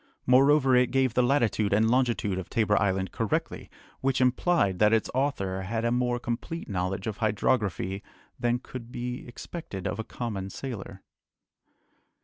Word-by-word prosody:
Moreover, 135 +1 +5
it 125 -1 +4
gave 130 -2 +2
the 125 - +3
latitude 120 -5 +2
and 110 +2 +4
longitude 115 -6 +1
of 95 - -7
Tabor 105 -2 +2
Island 95 -2 0
correctly, - - -2 0.3
which 135 0 0
implied 125 - +2
that 105 +1 +5
its 110 - +1
author 125 -9 -1
had 110 +4 -2
a 115 - +2
more 125 0 +1
complete 120 +8 -4
knowledge 95 0 -2
of 110 -2 -3
hydrography 105 -3 0 0.4
than 120 0 +1
could 125 -1 -9
be 125 +1 -5
expected 120 - -7
of - - -2
a - - -1
common 105 -5 -5
sailor. 95 -5 -7
115 Hz, 150 wpm, -27 LUFS, 100-125 Hz, 0.4 s, Moreover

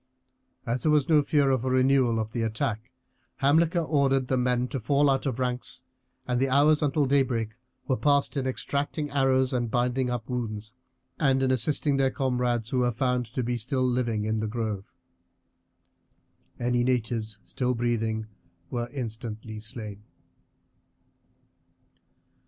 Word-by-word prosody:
As 120 +1 -1
there 155 - +3
was 150 -2 +3
no 155 -3 +5
fear 145 -2 +2
of 130 -2 +1
a 130 - 0
renewal 130 -2 +3
of 110 0 -3
the 115 - -2
attack, 115 +1 -2 0.5
Hamilcar 165 +5 +3
ordered 135 -4 +2
the 130 - +2
men 125 0 +1
to 135 - -3
fall 140 +5 +3
out 135 +1 0
of 125 -3 -2
ranks, 125 0 -2 0.4
and 125 -1 0
the 135 +1 +2
hours 145 +3 +4
until 145 0 +2
daybreak 130 -5 +1 0.4
were 130 - +2
passed 145 -1 +2
in 135 -2 -1
extracting 145 +3 -2
arrows 130 -2 +2
and 120 -2 0
binding 125 +2 0
up 120 -2 -3
wounds, 110 -3 -4 0.5
and 135 -3 +3
in 130 - +2
assisting 140 +3 +1
their 135 -1 +3
comrades 125 -4 -1
who 130 - 0
were 125 -1 +2
found 125 0 0
to 130 - -3
be 120 +1 -1
still 130 +3 -1
living 120 -4 0
in 110 0 0
the 110 0 -1
grove. 105 -3 -4 1.7
Any 120 0 +1
natives 115 -3 -1
still 125 -1 -1
breathing 115 -2 -1 0.5
were 120 -1 -2
instantly 110 -4 -5
slain. 105 -2 -6
125 Hz, 150 wpm, -27 LUFS, 115-135 Hz, 1.7 s, no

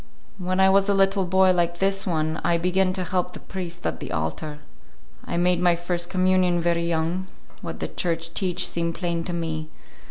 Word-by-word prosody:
When 185 +1 -1
I 190 - +6
was 195 +1 +4
a 200 - +3
little 195 0 +3
boy 190 +1 +4
like 175 -1 0
this 195 +1 +2
one, 160 -2 -1
I 170 -1 +2
begin 185 +2 +2
to 185 -1 -1
help 180 0 -1
the - - -8
priest 175 -2 -6
at - - -2
the - - -7
altar. 80 - -3 0.7
I - - -3
make 180 0 +2
my 175 -1 +4
first 175 0 -2
communion 185 -1 +2
very 170 0 +1
young; 170 +3 -1 0.3
what - - -6
the - - -1
Church 165 -1 -3
teach 180 -1 +1
seem 170 0 -2
plain 170 -1 -2
to 175 - -4
me. 160 -2 -3
175 Hz, 195 wpm, -24 LUFS, 170-185 Hz, 0.7 s, I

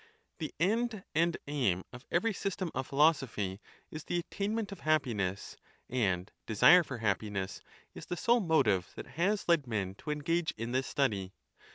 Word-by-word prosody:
The 155 - -3
end 215 +3 +1
and 170 +2 +2
aim 120 -11 0
of 125 +2 -10
every 220 +6 +1
system 185 -3 -3
of 130 - -3
philosophy 135 - +2 0.3
is 155 0 -6
tlie 175 - -1
attainment 205 +4 -2
of 195 - -8
hap 155 -2 +3
piness; 100 -6 -3 0.3
and 100 -7 0 0.2
desire 115 - +7
for 130 -5 -6
happiness 100 -3 -2 0.3
is - - -10
the 175 - -3
sole 240 +5 +3
motive 130 - +2
that - - -7
has 195 +6 -1
led 165 -6 +3
men 100 -5 -2
to - - -8
engage 160 +3 0
in 115 +2 -4
this 130 +1 0
study. 100 -9 0
145 Hz, 165 wpm, -32 LUFS, 105-175 Hz, 0.3 s, desire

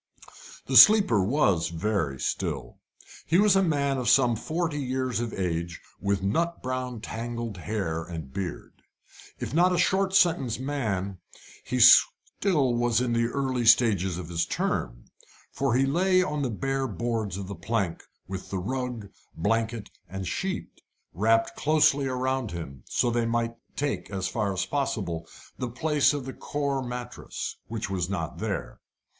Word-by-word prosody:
The - - +3
sleeper 200 - +8
was 100 - +2
very 85 -6 -1
still. 75 -10 -3 0.5
He 165 - +3
was 205 0 +5
a 195 - +5
man 140 -6 +1
of 120 -2 0
some 125 -2 +5
forty 160 +5 -2
years 130 -3 -1
of 120 -1 -3
age, 85 -2 -3 0.2
with 100 0 -1
nut 170 +13 -1
brown 130 -2 -3
tangled 115 -2 -5
hair 85 -2 -3
and 80 -5 -8
beard. 95 -3 -6 0.6
If 110 - -5
not 175 +3 +4
a 180 - +1
short 190 +2 +2
sentence 160 - +3
man 105 -9 -3 0.4
he - - -4
was - - +9 0.4
still 135 -11 +2 0.2
in 120 - -1
the 115 0 +2
early 130 -2 -1
stages 100 -7 +4
of 90 -2 -7
his 85 -1 -1
term - - -2 0.5
for 135 -3 0
he 135 +1 +3
lay 185 +6 +3
on 150 -5 -2
the 135 - 0
bare 135 +4 -1
boards 110 -3 -2
of 100 - -5
the 100 - -5
plank 100 -6 -2 0.2
with 95 0 -6
the 95 - -2
rug, 125 +2 -3 0.3
blanket, 115 +4 -1 0.2
and 95 0 -5
sheet 190 - -4 0.3
wrapped 115 - +2
closely 150 -2 +3
round 130 -1 -1
him, 80 -7 -7
so 120 - +1
that 120 - 0
they 115 - +1
might 115 0 0 0.2
take, 140 -11 -2
as 95 -2 -2
far 105 -3 -1
as 95 -1 -1
possible, 95 - -2 0.3
the 125 - -2
place 145 +4 +2
of 145 -3 -4
the 130 - -6
coir 140 -2 -2
mattress, 125 -1 -6
which 115 -1 -4
was 95 -2 -2
not 85 -5 -4
there. - - -4
120 Hz, 160 wpm, -27 LUFS, 95-135 Hz, 0.6 s, was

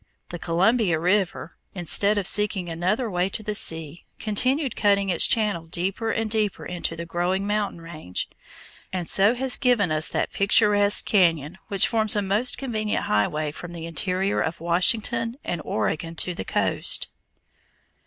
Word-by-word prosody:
The 175 - -6
Columbia 180 +2 +2
River, 180 -1 -1 0.2
instead 200 +4 0
of 200 - -1
seeking 205 -2 +2
another 185 +9 -1
way 180 -2 0
to 215 - -5
the 210 0 -3
sea, 160 -4 -1
continued 255 +6 0
cutting 200 -1 +2
its 175 - +4
channel 210 -7 0
deeper 190 +6 -2
and 225 0 -1
deeper 215 -2 -1
into 175 -2 -3
the 170 0 -6
growing 175 +3 -1
mountain 205 -4 -2
range, 155 - -5 0.6
and 180 -3 -3
so 200 +5 +4
has 260 0 0
given 235 - +2
us 155 0 +1
that - - -2
picturesque 205 0 +3
cañon 165 -6 +2
which 195 -2 +3
forms 220 -2 +3
a 205 - +1
most 210 +6 +1
convenient 220 -5 -2
highway 150 +9 0
from 175 +3 -9
the 165 -1 -6
interior 185 +4 -1
of 160 +1 -3
Washington 230 +7 +1
and 175 -2 -3
Oregon 160 +9 -2
to 180 +2 -1
the 95 - -6
coast. - - 0
195 Hz, 155 wpm, -24 LUFS, 170-215 Hz, 0.6 s, its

